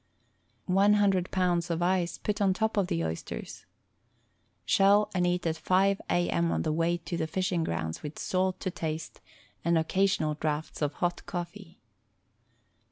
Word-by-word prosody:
One 195 +3 +4
hundred 195 -3 +2
pounds 175 -2 +1
of 170 0 -1
ice 175 -1 +1
put 210 0 -2
on 190 -2 +3
top 220 +2 0
of 200 -3 +2
the 85 - -1
oysters. 80 -6 -6 1.0
Shell 200 +2 +4
and 180 -2 +1
eat 180 0 0
at 160 -1 0
5 190 +4 +2
a. 175 0 +2
m. 170 0 +1
on - - 0
the 155 - 0
way 165 +2 +1
to 170 +1 -5
the 160 - -1
fishing 180 0 0
grounds 80 - -3
with 150 0 -7
salt 185 0 0
to 185 - -2
taste, 160 -2 -5 0.4
and 170 0 +3
occasional 160 -1 +1
draughts 155 +1 -3
of 145 0 0
hot 175 +3 -1
cofEee. 175 +1 -6
175 Hz, 165 wpm, -29 LUFS, 160-190 Hz, 1.0 s, One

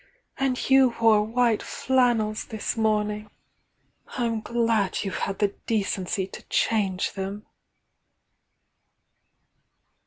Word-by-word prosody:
— - - -41
and 265 -2 0
you 265 -3 +5
wore 225 -2 +5
white 230 0 +1
flannels 240 -5 +1
this 220 -2 -4
morning! 210 -1 0 0.4
— - - -17
J 245 - 0
™ 225 -2 -1
glad 230 -5 0
you've 195 - -3
had 195 - -2
the 205 - +2 0.2
decency 195 -3 -1
to 190 - -10
change 195 -4 +1
them!" 195 +1 -5
215 Hz, 115 wpm, -25 LUFS, 205-235 Hz, 0.4 s, you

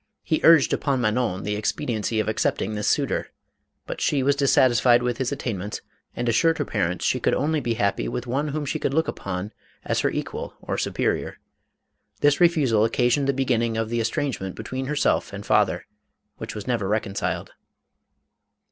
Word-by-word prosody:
He 155 - 0
urged 165 -4 +6
upon 140 -3 0
Manon, 110 -4 0
the 105 0 -2
expediency 105 +1 -1
of 110 - 0
accepting 110 0 0
this 105 -1 -2
suitor, - - 0 0.6
but - - -6
she 140 -3 +1
was 140 +1 +3
dissatisfied 125 -3 +4
with 120 0 -1
his 130 0 -1
attainments 105 -7 -4 0.3
and 120 - -2
assured 165 +8 +3
her 145 - -1
parents 90 -6 -1
she 130 - +1
could - - +1
only 155 +2 +1
be 120 -4 -1
happy 100 - 0
with 120 - -4
one 135 +5 -1
whom 150 0 -3
she - - -2
could 135 - -1
look 160 +1 +2
upon 95 +2 -4 0.3
as - - 0
her - - +2
equal - - -5
or - - -4
superior. - - -1 0.8
This 145 0 +4
refu 170 -5 +4
sal 110 -3 +3
occasioned 125 +4 +2
the - - +4
beginning 120 -4 0
of 115 -1 -1
the 120 0 -1
estrangement 115 -4 -2
be - - -7
tween 130 0 -4
herself 150 +1 +1
and - - -7
father, - - +2 0.5
which - - -7
was 105 -2 -6
never 115 -6 -1
reconciled. 100 -1 -2
120 Hz, 180 wpm, -24 LUFS, 105-140 Hz, 0.8 s, urged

